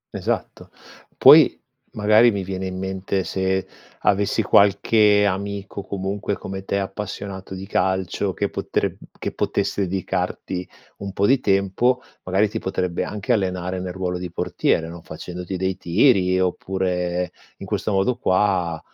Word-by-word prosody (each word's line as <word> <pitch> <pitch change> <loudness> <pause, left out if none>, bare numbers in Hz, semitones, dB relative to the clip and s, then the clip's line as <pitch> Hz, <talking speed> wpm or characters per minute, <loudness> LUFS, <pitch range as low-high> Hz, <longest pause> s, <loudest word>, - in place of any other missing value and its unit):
Esatto. - - -3 0.5
Poi - - +8 0.3
magari, 110 +3 +5
mi 100 -4 -2
viene 95 0 -4
in 95 0 -5
mente, 95 0 -2
se 95 0 -1 0.4
avessi 100 +2 +2
qualche 105 +1 +4
amico 100 0 -3
comunque 100 +1 -3
come 95 +1 -6
te, 100 - -1
appassionato 95 -1 -5
di 95 +1 -7
calcio 95 -2 0
che - - -1
potreb - - -2 0.2
che - - -4
potesse - - -1
dedicarti 90 -1 -3 0.3
un 100 -1 -6
po' 100 - +1
di 130 +5 +4
tempo, 105 +5 +1 0.2
magari 95 +3 +2
ti 110 +2 -4
potrebbe 90 -3 -2
anche 105 +4 -1
allenare 90 -3 -1
nel 90 0 -4
ruolo 90 -1 -3
di 90 0 -5
portiere, 80 0 0
no, 85 0 -9
facendoti 90 +3 -6
dei 95 0 -1
tiri, 95 0 +3
oppure 90 -1 -1 0.3
in - - -8
questo - - -2
modo 100 +5 +2
qua 95 -5 +1
95 Hz, 140 wpm, -22 LUFS, 90-100 Hz, 0.5 s, Poi